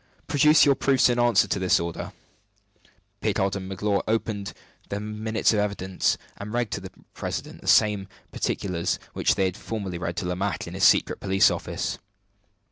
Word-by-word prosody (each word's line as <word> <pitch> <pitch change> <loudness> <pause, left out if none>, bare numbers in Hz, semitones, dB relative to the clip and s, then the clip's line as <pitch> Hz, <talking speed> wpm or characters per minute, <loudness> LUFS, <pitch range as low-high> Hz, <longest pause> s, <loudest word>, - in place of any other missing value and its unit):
"Produce 150 +2 +5
your 140 - +5
proofs 135 -1 +3
in 120 0 +1
answer 120 -4 +4
to 100 - -1
this 95 -1 +3
order." 85 -1 -5 1.1
Picard 95 +1 0
and 95 -1 -5
Magloire 100 +1 0
opened 110 -2 -1 0.4
their 100 - -3
minutes 110 +2 0
of 105 - +1
evidence, 100 -3 0 0.2
and 105 +1 -7
read 120 -2 -1
to - - -3
the - - -8 0.2
president - - -5
the - - -12
same 105 -2 +4 0.2
particulars 90 -3 -1 0.2
which - - +2
they 95 - +1
had 95 -1 -1
formerly 100 -6 -5
read 85 -1 -4
to 90 - -2
Lomaque 90 +3 -2
in - - -8
the - - -6
secret - - +4
police 95 0 +4
office. - - -3
100 Hz, 170 wpm, -25 LUFS, 95-110 Hz, 1.1 s, Produce